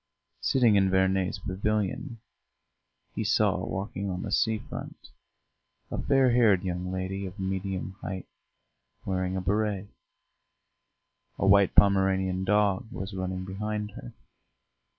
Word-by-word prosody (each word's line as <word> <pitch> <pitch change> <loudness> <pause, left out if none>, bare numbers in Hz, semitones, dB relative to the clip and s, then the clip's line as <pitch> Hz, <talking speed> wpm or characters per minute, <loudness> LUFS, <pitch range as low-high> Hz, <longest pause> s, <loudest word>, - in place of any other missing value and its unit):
Sitting 120 -6 +4
in 95 -1 +3
Verney's 95 0 +1
pavilion, 105 +5 -2 1.0
he - - -2
saw, - - +2
walking 95 0 -4
on 90 0 -3
the 100 - -5
sea 110 +1 +2
front, - - -9 0.8
a - - -2
fair 135 -2 +3
haired 110 -6 +4
young 90 0 -3
lady 95 +1 -3
of 95 +3 -10
medium 95 0 -3
height, 95 -1 -5 0.8
wearing 95 0 -1
a - - -1
béret; 105 0 0 1.5
a - - 0
white 100 -1 +5
Pomeranian 95 -2 +3
dog 105 +2 +1
was 95 -3 -6
running 95 -1 -3
behind 105 +2 -4
her. - - -9
95 Hz, 120 wpm, -28 LUFS, 95-105 Hz, 1.5 s, white